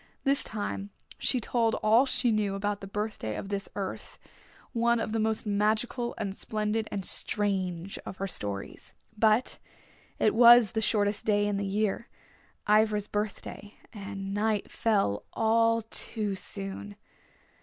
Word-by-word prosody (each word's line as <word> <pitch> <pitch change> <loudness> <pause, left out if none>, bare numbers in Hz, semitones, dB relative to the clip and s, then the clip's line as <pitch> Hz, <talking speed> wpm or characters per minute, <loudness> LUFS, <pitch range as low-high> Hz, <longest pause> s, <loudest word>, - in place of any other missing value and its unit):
This 275 0 +3
time 205 -1 -4 0.3
she 255 - +1
told 230 -1 +1
all 230 +5 +4
she 245 -2 +1
knew 210 -2 0
about 205 +1 -2
the 195 - -7
birthday 210 - -3
of 195 - -6
this 200 0 -2
Earth, 195 -2 -5 0.6
one 235 0 +2
of 225 - -2
the 225 - 0
most 220 0 0
magical 220 +4 0
and 205 -3 -3
splendid 215 +1 -2
and 195 -2 -3
strange 190 -3 -1
of 185 - -8
her 195 - -2
stories. 100 - -5 0.2
But 220 +3 +2 0.6
it 215 - +3
was 235 -2 +8
the 220 - -1
shortest 205 -1 +1
day 205 -1 +3
in 205 -1 0
the 200 0 -2
year, 210 +3 -1 0.6
Ivra's 210 -1 +3
birthday, 210 0 -5 0.2
and 195 -2 -6
night 210 0 0
fell 200 - +1
all 230 0 +3
too 215 -1 -3
soon. 195 +1 -5
210 Hz, 145 wpm, -29 LUFS, 200-225 Hz, 0.6 s, was